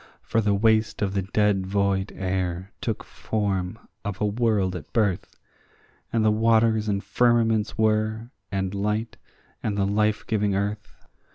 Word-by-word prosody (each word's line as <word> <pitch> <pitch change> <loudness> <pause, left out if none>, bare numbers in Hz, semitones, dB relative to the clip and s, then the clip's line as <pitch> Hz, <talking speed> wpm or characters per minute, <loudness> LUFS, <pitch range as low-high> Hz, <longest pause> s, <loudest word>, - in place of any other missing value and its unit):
For 115 - +1
the 105 -1 +2
waste 110 +1 +2
of 100 -1 -1
the 100 - +1
dead 95 0 +1
void 100 0 0
air 95 0 -2
took 110 -3 -2
form 100 -2 -2 0.3
of 105 -3 -4
a 105 - +1
world 105 -4 +1
at - - -8
birth, 100 -6 0 0.7
And 115 -2 +1
the 110 - +5
waters 110 0 +3
and 100 -1 -1
firmaments 115 -3 +2
were, 110 +1 +1 0.2
and 95 -1 -1
light, 105 +3 -2 0.4
and 105 -2 -2
the 100 - +2
life 105 +1 +1
giving 105 -3 0
earth. 105 +2 -4
105 Hz, 150 wpm, -25 LUFS, 100-110 Hz, 0.7 s, the